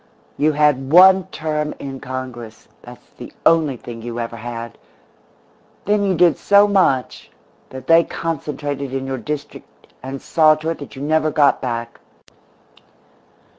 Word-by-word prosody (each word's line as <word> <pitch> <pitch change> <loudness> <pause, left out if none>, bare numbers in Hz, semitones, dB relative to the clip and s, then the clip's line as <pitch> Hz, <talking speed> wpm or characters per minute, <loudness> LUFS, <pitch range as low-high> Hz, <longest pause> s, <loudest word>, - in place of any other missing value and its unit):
"You 150 +1 +1
had 145 -2 +1
one 190 +1 +7
term 150 -1 -3
in 135 -1 -7
Congress 125 -4 -8
that's 120 0 -14
the - - -9
only 155 -5 +3
thing 115 -1 -10
you 120 +1 -6
ever 115 0 -5
had. 115 0 -8 1.1
Then 205 0 +1
you 195 -2 +1
did 170 -1 +3
so 200 0 +5
much 185 -11 0 0.4
that 130 0 -10
they 165 +2 +5
concentrated 145 -5 -5
in 135 0 -3
your 135 -1 -4
district 150 +1 -8
and 135 +1 -7
saw 155 +1 +3
to 155 +1 -5
it 165 - -6
that 145 - -10
you 135 - -7
never 155 +1 +1
got 145 -1 +2
back. 115 -2 -5
145 Hz, 145 wpm, -19 LUFS, 130-160 Hz, 1.1 s, one